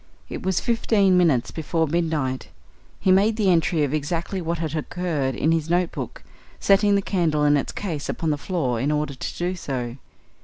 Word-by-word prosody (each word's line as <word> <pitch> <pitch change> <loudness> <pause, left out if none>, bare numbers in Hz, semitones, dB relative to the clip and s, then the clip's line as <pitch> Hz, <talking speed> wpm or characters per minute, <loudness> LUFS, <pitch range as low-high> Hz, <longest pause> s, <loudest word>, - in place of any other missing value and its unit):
It - - -5
was 190 -2 0
fifteen 215 -5 +2
minutes 160 -9 +3
before 160 +1 -1
midnight; 155 -5 -1 0.5
he 190 - +2
made 205 +4 +4
the 205 -4 +3
entry 165 -2 +2
of 145 0 -1
exactly 165 +5 -2
what 170 0 -2
had 160 -2 -3
occurred 155 -5 -2
in 155 - +1
his 165 -1 0
notebook, 175 0 -1 0.4
setting 200 +1 +4
the 200 - +1
candle 160 -7 +1
in 145 0 +5
its 140 - -1
case 165 -8 -4
upon 160 -2 -1
the 150 - 0
floor 140 -10 -1
in 140 +5 0
order 150 -1 -1
to 130 - -6
do 180 +1 -1
so. 125 -7 -4
165 Hz, 185 wpm, -23 LUFS, 145-185 Hz, 0.5 s, in